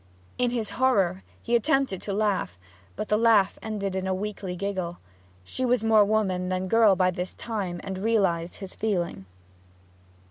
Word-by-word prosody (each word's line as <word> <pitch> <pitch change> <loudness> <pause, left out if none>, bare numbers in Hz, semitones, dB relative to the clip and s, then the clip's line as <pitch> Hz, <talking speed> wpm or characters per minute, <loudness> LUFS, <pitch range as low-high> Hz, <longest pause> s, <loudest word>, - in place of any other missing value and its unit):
In 250 -1 +2
his 235 -3 -3
horror 195 -8 +2 0.2
he 235 - +1
attempted 265 - +1
to 205 - -5
laugh, 200 - 0 0.4
but - - -4
the 210 - +3
laugh 225 -4 +4
ended 200 -3 -3
in 190 0 -2
a 190 - 0
weakly 195 -2 -4
giggle. 185 -2 -3 0.5
She 175 - -4
was 250 -2 +2
more 220 -1 +5
woman 195 -4 0
than 185 0 -1
girl 220 -1 +5
by 185 0 +2
this 180 0 -5
time, 195 -6 -4
and 190 -1 -5
realized 190 -6 +1
his 195 -2 -8
feeling. 175 - -2
200 Hz, 165 wpm, -26 LUFS, 185-220 Hz, 0.5 s, more